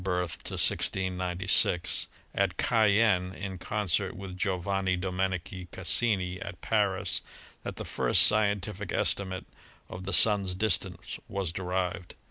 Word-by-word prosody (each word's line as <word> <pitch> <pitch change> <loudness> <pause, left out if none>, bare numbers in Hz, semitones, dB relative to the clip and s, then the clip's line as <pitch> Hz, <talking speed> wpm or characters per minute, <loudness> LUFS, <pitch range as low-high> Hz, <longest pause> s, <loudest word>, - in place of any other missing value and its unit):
i6g6) 90 0 0 0.3
at - - 0
Cayenne 105 -4 +3
in 95 -2 -6
concert 105 -2 -1
with 95 -1 -7
Giovanni 95 0 0
Domenico 95 0 -3
Cassini 95 -1 0
at 100 -5 -7
Paris 100 -3 +2 0.4
that - - -6
the - - -6
first - - +4
scientific 105 -3 +1
estimate 95 -2 0 0.4
of 95 +1 -8
the 100 - -3
Sun's 100 -4 +4
distance 95 -3 -1
was 95 -4 -2
derived. 90 0 -3
95 Hz, 105 wpm, -29 LUFS, 90-100 Hz, 0.4 s, first